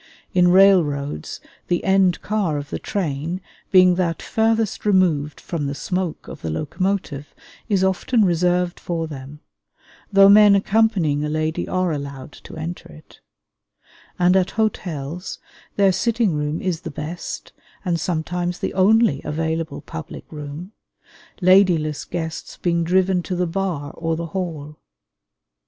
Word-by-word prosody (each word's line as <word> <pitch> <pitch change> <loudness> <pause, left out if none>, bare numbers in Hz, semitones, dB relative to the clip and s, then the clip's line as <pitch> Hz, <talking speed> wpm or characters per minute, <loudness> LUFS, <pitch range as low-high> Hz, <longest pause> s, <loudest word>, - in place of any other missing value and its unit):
In 180 -1 +4
railroads 165 - +3 0.3
the 175 - 0
end 190 -2 +2
car 200 -8 0
of 145 0 -7
the - - -3
train, 165 -2 -3 0.3
being 185 -1 +6
that 165 -2 -1
farthest 225 -1 0
removed 175 -8 +2
from 155 -5 -4
the 140 - -3
smoke 180 +2 -3
of - - -9
the 80 - -4
locomotive, 155 - -3 0.3
is 195 -3 +2
often 200 +4 +2
reserved 180 0 +1
for 165 -2 -3
them 145 -1 -9 0.7
(though 195 0 +7
men 205 0 +7
accompanying 195 -8 +2
a 150 - -2
lady 155 +1 -1
are 185 -1 0
allowed 140 -1 -6
to - - -12
enter 165 - -6
it); 75 +1 -16 1.0
and 180 +1 +4
at 185 -1 +3
hotels 180 -6 -2 0.4
their 200 -1 +4
sitting 225 +1 +1
room 150 +1 -2
is 180 -3 -1
the 170 - -6
best 155 +4 -6 0.3
and 170 -2 0
sometimes 175 +2 -2
the - - -3
only 195 - +3
available 160 +1 -3
public 160 -1 -8
room, 150 +5 -7 0.7
ladyless 180 -5 +4
guests 160 -2 -5
being 170 -1 0
driven 185 +1 +2
to 180 +1 -4
the 180 0 0
bar 165 -5 -3
or 165 0 -2
the 170 +1 -4
hall. 155 -5 -5
175 Hz, 140 wpm, -21 LUFS, 155-190 Hz, 1.0 s, though